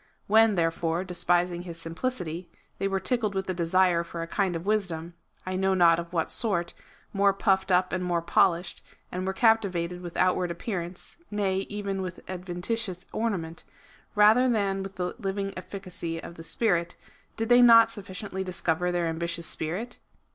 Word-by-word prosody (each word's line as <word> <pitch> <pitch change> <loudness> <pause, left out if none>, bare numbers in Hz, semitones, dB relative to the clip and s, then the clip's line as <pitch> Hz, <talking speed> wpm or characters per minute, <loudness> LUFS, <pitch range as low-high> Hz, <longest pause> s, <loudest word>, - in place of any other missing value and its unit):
When, 220 0 +5
therefore, 165 0 0
despising 175 -1 0
his 170 -2 -8
simplicity, 175 -1 -4 0.3
they 195 - +1
were 195 0 0
tickled 220 -3 -1
with 190 0 -2
a - - -2
desire 175 0 +2
for 170 0 -6
a - - -6
kind 190 0 0
of 165 +2 -5
wisdom, 180 -6 -1 0.3
I 185 0 -3
know 190 0 +2
not 170 -2 +5
of 170 0 -6
what 165 -3 -1
sort, 185 -7 0 0.4
more 200 0 +4
puffed 190 -1 +1
up 180 0 +3
and 185 -1 -1
more 175 -2 0
polished, 175 +1 +2 0.3
and 185 +1 -3
were 190 - 0
caj)tivated 185 -7 +2
with 175 -1 -7
outward 180 -1 +2
appearance, 175 -1 -5
nay, 195 -2 -1
even 200 -2 -3
with 185 -1 -7
adventitious 185 +2 -4
ornament, 185 -8 -2 0.5
rather 220 +5 +6
than 200 -4 +1
with 195 0 -7
the 180 -1 -2
living 195 -1 -2
efiicacy 185 -3 -6
of 170 - -9
the 165 - -11
Spirit, 170 -1 0 0.4
did 225 +1 -2
they 245 0 +7
not 230 -1 +8
sufficiently 195 -2 -5
discover 180 -1 -1
their 175 -1 0
ambitious 170 +1 -2
spirit 180 +13 -3
185 Hz, 165 wpm, -27 LUFS, 170-200 Hz, 0.5 s, not